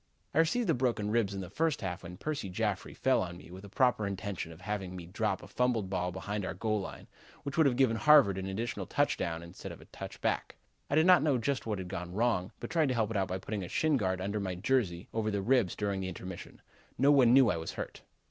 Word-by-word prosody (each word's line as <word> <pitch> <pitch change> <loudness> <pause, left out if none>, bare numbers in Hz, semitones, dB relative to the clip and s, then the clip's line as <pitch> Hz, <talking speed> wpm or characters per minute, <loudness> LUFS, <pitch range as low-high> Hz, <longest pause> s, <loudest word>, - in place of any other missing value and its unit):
"I 155 - +2
received 205 +9 +2
the 165 - +4
broken 120 -5 0
ribs 110 -4 +1
in 95 - -3
the 90 - -7
first 160 +4 0
half 90 -2 -3
when 90 0 -9
Percy 145 -8 -3
Jaffrey 90 - -2
fell - - +2
on 85 -1 -4
me 85 - -13
with 95 +2 -10
a 100 - -10
proper 115 -2 +2
intention 95 -3 -4
of 80 +2 -13
having 95 -2 -4
me 90 -2 -7
drop 95 +2 -2
a - - -9
fumbled 120 -6 0
ball 90 -1 -1
behind 100 +3 -4
our - - -3
goal 110 -2 0
line, - - -8 0.4
which 140 0 -4
would 160 -3 +5
have 125 - +2
given 120 -3 +3
Harvard 135 -8 +6
an 95 - -4
additional 110 +5 -3
touchdown 85 0 0
instead 85 +1 -9
of - - -10
a - - -14
touchback. - - -3 0.3
I 140 - +1
did 155 +1 +5
not 185 -1 +7
know 145 -3 +2
just 125 +1 -1
what 105 -2 -1
had 95 -1 -5
gone 90 0 -5
wrong 110 -5 +1
but - - -6
tried 160 -3 +3
to 130 - 0
help 110 -2 0
it 110 - -1
out 95 -1 +1
by 95 - -2
putting 100 +1 -4
a 85 - -6
shin 155 -2 +2
guard 95 -6 0
under 100 +3 -2
my 95 -2 -3
jersey 95 -4 0
over 110 -1 0
the 100 -2 -1
ribs 120 -6 +2
during 100 -2 -1
the 95 - -3
intermission. 90 0 -8 0.3
No 140 +4 +5
one 130 -5 +6
knew 130 -3 +6
I 85 - -1
was 80 - -5
hurt. - - -6
105 Hz, 250 wpm, -31 LUFS, 95-125 Hz, 0.4 s, not